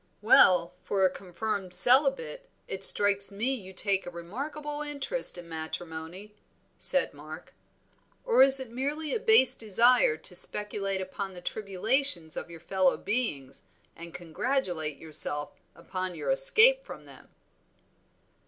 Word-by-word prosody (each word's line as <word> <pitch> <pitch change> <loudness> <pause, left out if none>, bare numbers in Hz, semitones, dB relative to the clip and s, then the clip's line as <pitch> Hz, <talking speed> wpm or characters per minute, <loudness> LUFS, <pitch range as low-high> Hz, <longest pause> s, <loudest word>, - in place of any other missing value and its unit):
"Well, 180 -8 +4
for 195 -1 -1
a 185 - +1
confirmed 190 0 -6
celibate, 275 - +3 0.2
it 195 0 -5
strikes 200 0 +4
me 225 +7 -2
you 195 -7 -6
take 195 0 -2
a - - -5
remarkable 285 - -8
interest 295 - -1
in 175 -1 -12
matrimony," 160 +4 -9 0.5
said 275 -1 +2
Mark. 155 +2 -13 0.7
"Or 465 - +2
is 270 0 +8
it 260 -3 -8
merely 290 +5 -5
a 465 - -2
base 425 - +5
desire 230 -6 +2
to 170 +3 -3
speculate 195 0 -2
upon 190 0 -8
the - - -9
tribulations 195 - -2
of - - -8
your 170 -1 -12
fellow 185 +2 -1
beings, 145 - -3 0.3
and 170 0 -11
congratulate 175 - -4
yourself 150 -2 -4 0.2
upon 185 +1 -7
your - - -4
escape - - +5
from - - -12
them?" - - -17
200 Hz, 135 wpm, -26 LUFS, 175-270 Hz, 0.7 s, is